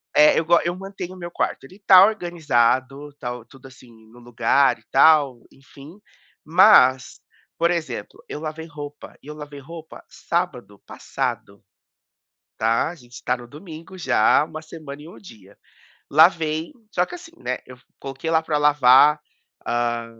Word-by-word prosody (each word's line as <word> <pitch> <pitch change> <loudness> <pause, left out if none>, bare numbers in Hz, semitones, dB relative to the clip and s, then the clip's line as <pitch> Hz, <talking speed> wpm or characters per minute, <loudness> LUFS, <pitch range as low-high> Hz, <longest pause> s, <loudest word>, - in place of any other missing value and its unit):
eh, 150 0 +5
eu - - -2
go 170 +1 +4
eu 175 +1 -2
mantenho 190 -1 -8
o - - -14
meu 175 -1 -8
quarto, - - -3
ele 190 +8 -16
tá 185 +1 +8
organizado, 145 - -1
tá 120 -2 -5
o 120 -2 -12
tudo 135 -1 -16
assim, 130 -2 -18 0.2
no 120 - -17
lugar 120 +3 +1
e - - -28
tal, 140 -3 +4
enfim, 140 +5 -16 0.5
mas, 155 -7 +4 0.4
por 170 +1 +1
exemplo, 170 -2 -5
eu 150 - -6
lavei 160 +1 -7
roupa 145 -1 -11
e - - -17
eu 150 - -7
lavei 145 -1 -10
roupa 160 +2 -12
sábado 125 - -4
passado, 100 0 -6 1.0
tá, 115 +6 +1
a 175 - -9
gente 120 -4 -15
tá 125 - 0
no 120 - -12
domingo 165 +5 -12
já, 130 -4 +2
uma 155 0 -9
semana 155 -3 -11
e 160 - -12
um - - -14
dia. 105 - -16 0.5
Lavei, 160 0 +3 0.2
só 180 - 0
que - - -10
assim, 335 -1 -12
né, 125 - -4
eu 125 0 -13
vo 125 - -27 0.2
coloquei 135 +4 -6
lá 160 0 +2
pra 150 -2 -1
lavar, 145 0 +5 0.5
ah, 120 -1 -2
150 Hz, 165 wpm, -21 LUFS, 125-170 Hz, 1.0 s, tá